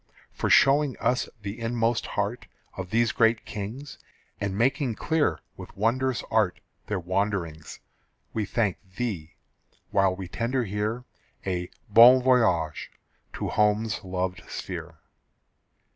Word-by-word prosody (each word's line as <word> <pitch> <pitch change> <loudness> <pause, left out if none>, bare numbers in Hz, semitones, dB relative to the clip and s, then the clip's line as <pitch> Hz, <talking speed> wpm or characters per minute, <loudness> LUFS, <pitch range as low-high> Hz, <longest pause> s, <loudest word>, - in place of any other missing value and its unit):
For - - -2
showing 140 -1 +5
us 125 0 0
the 100 +4 -5
inmost 115 0 0
heart 105 +4 -2 0.3
Of 95 -1 -6
these 115 +2 +2
great 115 0 +2
kings, 115 +7 -7 0.4
And 100 -1 -2
making 125 +1 +1
clear 160 +4 0 0.2
with - - -11
wondrous 125 +4 +1
art 110 -5 +2 0.3
Their 105 -3 -1
wanderings, 90 -4 -2 0.5
We 110 -2 -1
thank 105 -2 0 0.2
thee, 95 -9 -4 0.6
while 95 -2 +3
we 95 -1 -6
tender 120 +6 -1
here 105 +4 -3 0.4
A 90 -2 -2 0.2
"bon 120 +5 +8
voyage" 100 - +2 0.4
to - - -3
home's 105 0 +1
loved 90 0 -3
sphere. - - -6
110 Hz, 120 wpm, -26 LUFS, 95-120 Hz, 0.6 s, bon